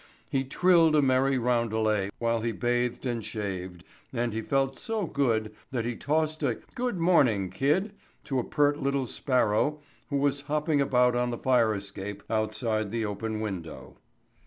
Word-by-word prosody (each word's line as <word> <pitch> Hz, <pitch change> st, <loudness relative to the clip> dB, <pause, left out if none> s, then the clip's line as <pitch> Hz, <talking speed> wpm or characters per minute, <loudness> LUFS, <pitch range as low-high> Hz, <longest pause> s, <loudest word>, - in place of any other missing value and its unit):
He 135 Hz, -1 st, 0 dB
trilled 165 Hz, +3 st, +4 dB
a 150 Hz, -, +5 dB
merry 135 Hz, 0 st, +3 dB
roundelay 110 Hz, -4 st, +1 dB
while 115 Hz, -1 st, 0 dB
he 115 Hz, +1 st, -1 dB
bathed 120 Hz, +1 st, -1 dB
and 120 Hz, -3 st, -2 dB
shaved, 95 Hz, -5 st, -5 dB, 0.3 s
and 120 Hz, -2 st, -1 dB
he 110 Hz, -, -2 dB
felt 135 Hz, +3 st, 0 dB
so 225 Hz, -4 st, -2 dB
good 115 Hz, -8 st, 0 dB, 0.2 s
that 120 Hz, -4 st, -2 dB
he 120 Hz, 0 st, -2 dB
tossed 155 Hz, +3 st, -1 dB
a 125 Hz, -6 st, 0 dB, 0.2 s
"good 245 Hz, -5 st, -2 dB
morning, 125 Hz, -, +3 dB
kid" 185 Hz, +10 st, +1 dB, 0.3 s
to 135 Hz, -2 st, -1 dB
a -, -, -1 dB
pert 145 Hz, +1 st, +1 dB
little 140 Hz, -1 st, 0 dB
sparrow 125 Hz, +3 st, +1 dB, 0.3 s
who 140 Hz, -, 0 dB
was 140 Hz, 0 st, +1 dB
hopping 150 Hz, 0 st, 0 dB
about 125 Hz, -2 st, +3 dB
on 120 Hz, 0 st, +1 dB
the 120 Hz, -, -3 dB
fire 120 Hz, -4 st, +3 dB
escape 100 Hz, 0 st, -6 dB
outside 110 Hz, 0 st, -1 dB
the 115 Hz, +1 st, -2 dB
open 110 Hz, +1 st, -3 dB
window. 95 Hz, -7 st, -6 dB
125 Hz, 160 wpm, -28 LUFS, 110-140 Hz, 0.3 s, a